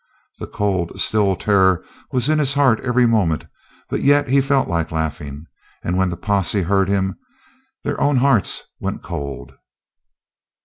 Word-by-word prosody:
The -, -, -6 dB
cold, 95 Hz, -3 st, -2 dB
still 100 Hz, -2 st, +2 dB
terror 95 Hz, -2 st, +2 dB, 0.3 s
was 125 Hz, 0 st, +1 dB
in 155 Hz, 0 st, +2 dB
his 145 Hz, -1 st, +1 dB
heart 135 Hz, -6 st, +3 dB
every 125 Hz, 0 st, +2 dB
moment, 100 Hz, -9 st, +1 dB, 0.4 s
but -, -, -3 dB
yet 145 Hz, -1 st, +3 dB
he 135 Hz, +1 st, +4 dB
felt 135 Hz, 0 st, +1 dB
like 85 Hz, -1 st, -2 dB
laughing, 75 Hz, -2 st, -4 dB, 0.4 s
and 90 Hz, -, -1 dB
when 95 Hz, 0 st, +1 dB
the 85 Hz, -, -5 dB
posse 100 Hz, +1 st, 0 dB
heard 95 Hz, +1 st, +1 dB
him 95 Hz, -1 st, -1 dB, 0.6 s
their -, -, -3 dB
own 145 Hz, 0 st, +3 dB
hearts 125 Hz, -5 st, +3 dB, 0.2 s
went -, -, -4 dB
cold. 70 Hz, -1 st, -6 dB
100 Hz, 150 wpm, -20 LUFS, 85-125 Hz, 0.6 s, he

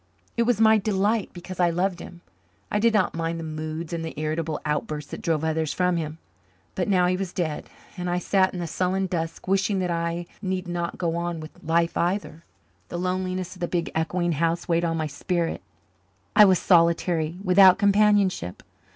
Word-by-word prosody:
It 235 Hz, -1 st, +1 dB
was 235 Hz, -4 st, +2 dB
my 220 Hz, -1 st, +6 dB
delight 205 Hz, +1 st, 0 dB
because 180 Hz, +1 st, -9 dB
I 175 Hz, -1 st, +4 dB
loved 175 Hz, +1 st, -1 dB
him. 175 Hz, 0 st, -10 dB, 0.5 s
I 210 Hz, -, +1 dB
did 230 Hz, +2 st, +4 dB
not 210 Hz, -4 st, +2 dB
mind 165 Hz, 0 st, -2 dB
the -, -, -5 dB
moods 155 Hz, +1 st, -5 dB
and 165 Hz, -1 st, -3 dB
the 160 Hz, -2 st, -6 dB
irritable 155 Hz, 0 st, -2 dB
outbursts 150 Hz, -1 st, -3 dB
that -, -, -6 dB
drove 160 Hz, -3 st, 0 dB
others 160 Hz, -1 st, 0 dB
from 180 Hz, -1 st, +1 dB
him. 155 Hz, -2 st, -3 dB, 0.6 s
But 180 Hz, -, -2 dB
now 185 Hz, -3 st, +3 dB
he 180 Hz, +1 st, +2 dB
was 185 Hz, -1 st, -4 dB
dead, 160 Hz, -5 st, -3 dB, 0.3 s
and 180 Hz, 0 st, -3 dB
I 175 Hz, -, 0 dB
sat 190 Hz, +1 st, +2 dB
in 180 Hz, -, -6 dB
the 175 Hz, -, -2 dB
sullen 185 Hz, +4 st, 0 dB
dusk, 165 Hz, -2 st, -4 dB
wishing 195 Hz, +1 st, +1 dB
that 180 Hz, -2 st, -1 dB
I 170 Hz, +1 st, -2 dB, 0.2 s
need 185 Hz, -2 st, -2 dB
not 175 Hz, -1 st, -3 dB
go 170 Hz, -2 st, -1 dB
on 170 Hz, -1 st, -3 dB
with 155 Hz, 0 st, -11 dB
life 170 Hz, +1 st, +1 dB
either. 165 Hz, -3 st, -1 dB, 0.5 s
The -, -, -4 dB
loneliness 185 Hz, 0 st, -2 dB
of -, -, -15 dB
the 175 Hz, -, -1 dB
big 170 Hz, -1 st, -2 dB
echoing 175 Hz, +2 st, 0 dB
house 165 Hz, +2 st, 0 dB
weighed 170 Hz, 0 st, +2 dB
on 165 Hz, -1 st, -1 dB
my 155 Hz, -, -1 dB
spirit. 165 Hz, +3 st, -2 dB, 0.7 s
I 210 Hz, -, +9 dB
was 190 Hz, -2 st, +5 dB
solitary, 170 Hz, -2 st, +2 dB
without 185 Hz, 0 st, +7 dB
companionship. 200 Hz, -, +2 dB
175 Hz, 195 wpm, -25 LUFS, 165-185 Hz, 0.7 s, I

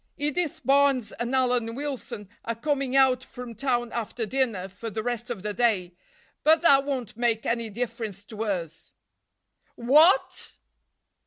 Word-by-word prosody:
Edith 300 Hz, +2 st, -1 dB
Barnes 275 Hz, -4 st, +3 dB
and 240 Hz, +2 st, -3 dB
Alan 245 Hz, -3 st, +1 dB
Wilson 270 Hz, -7 st, -5 dB, 0.2 s
are 230 Hz, -, -3 dB
coming 275 Hz, +1 st, -1 dB
out 260 Hz, -2 st, +4 dB
from 250 Hz, -3 st, -9 dB
town 240 Hz, -2 st, -1 dB
after 230 Hz, 0 st, -3 dB
dinner 225 Hz, -6 st, -1 dB
for 200 Hz, +4 st, -7 dB
the 220 Hz, +1 st, -4 dB
rest 240 Hz, 0 st, -3 dB
of 220 Hz, -6 st, -5 dB
the 210 Hz, 0 st, -2 dB
day, 200 Hz, -7 st, +1 dB, 0.5 s
but 320 Hz, +2 st, +4 dB
that 275 Hz, -4 st, +6 dB
won't 255 Hz, -7 st, -3 dB
make 230 Hz, -1 st, 0 dB
any 230 Hz, -1 st, -1 dB
difference 220 Hz, -3 st, -5 dB
to 215 Hz, +1 st, -6 dB
us." 170 Hz, -6 st, -4 dB, 0.8 s
"_What? 305 Hz, -, +4 dB
240 Hz, 145 wpm, -26 LUFS, 220-270 Hz, 0.8 s, that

